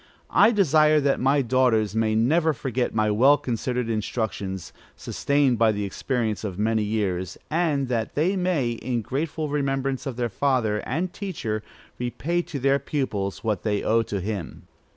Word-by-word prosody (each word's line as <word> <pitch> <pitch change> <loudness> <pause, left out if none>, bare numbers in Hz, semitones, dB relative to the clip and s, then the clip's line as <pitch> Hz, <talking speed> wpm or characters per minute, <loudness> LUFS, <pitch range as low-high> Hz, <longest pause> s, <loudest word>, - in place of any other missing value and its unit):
I 205 - +6
desire 155 - +4
that 140 -1 +1
my 135 +2 +3
daughters 115 -4 +2
may 110 -1 +1
never 155 +8 +3
forget 125 -2 -2
my 110 -1 +2
well 135 +7 +5
considered 125 0 -2
instructions, 105 -4 -3 0.2
sustained 140 -5 +1
by 115 -1 +5
the 105 -1 -3
experience 110 +1 -2
of 95 -4 -4
many 110 +1 +1
years; 100 -4 -2
and 155 -5 +1
that 115 -3 -2
they 175 +7 +2
may, 180 -10 0
in 120 0 -3
grateful 150 +5 -2
remembrance 135 -1 -1
of 130 - -4
their 120 0 -1
father 115 -1 0
and 170 +8 -2
teacher, 115 - -4 0.4
repay 155 +8 -1
to 170 -4 -6
their 135 +1 +2
pupils 120 -9 -3
what 105 -4 -1
they 105 -2 -1
owe 115 +1 +3
to 105 -3 -3
him. 100 -2 -5
125 Hz, 160 wpm, -24 LUFS, 110-145 Hz, 0.4 s, I